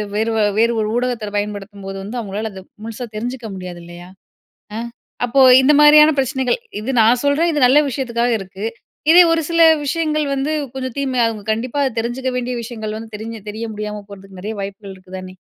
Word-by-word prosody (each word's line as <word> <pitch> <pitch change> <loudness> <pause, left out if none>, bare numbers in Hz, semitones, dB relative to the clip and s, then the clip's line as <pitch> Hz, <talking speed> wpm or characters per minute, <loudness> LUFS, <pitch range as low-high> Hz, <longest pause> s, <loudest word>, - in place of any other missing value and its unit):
வேறு 220 +2 0
வ - - +1 0.2
வேறு 235 +1 +3
ஒரு 210 - -1
ஊடகத்தை 240 -4 -2
பயன்படுத்தும்போது, 200 -1 -5
வந்து 230 +5 -5
அவங்களால 210 +1 -4
அதை 190 - -10 0.2
முழுசா 230 +2 -6
தெரிஞ்சுக்க 245 +1 -5
முடியாது, 180 -2 -8
இல்லையா. 175 +1 -11 0.7
அ. - - -3 0.5
அப்போ, 245 +3 +2 0.2
இந்த 290 +3 +4
மாரியான 300 +1 +8
பிரச்சனைகள். 265 - 0 0.2
இது 255 - -3
நான் 235 +3 +4
சொல்றேன், 315 +4 +2
இது 295 - 0
நல்ல 280 +4 +5
விஷயத்துக்காக 240 -2 -1
இருக்கு. 195 +2 -7 0.5
இதே 355 +1 +9
ஒரு 330 - +2
சில 335 0 +2 0.2
விஷயங்கள் 305 +1 0
வந்து, 275 +3 -1 0.2
கொஞ்சம் 260 -2 -5
தீமையா, 255 -4 +1
அவுங்க 215 -2 -7
கண்டிப்பா 240 +5 -2
அதை 265 - 0
தெரிஞ்சுக்க 250 +3 -2
வேண்டிய 250 0 -3
விஷயங்கள் 220 -2 -5
வந்து, 225 0 -10
தெரிஞ்சு 225 0 -7
தெரிய 220 +2 -5
முடியாம 210 0 -5
போறதுக்கு 195 -1 -12
நிறைய 215 +3 -5
வாய்ப்புகள் 195 0 -7
இருக்குதானே? 185 0 -10
230 Hz, 180 wpm, -19 LUFS, 205-260 Hz, 0.7 s, இதே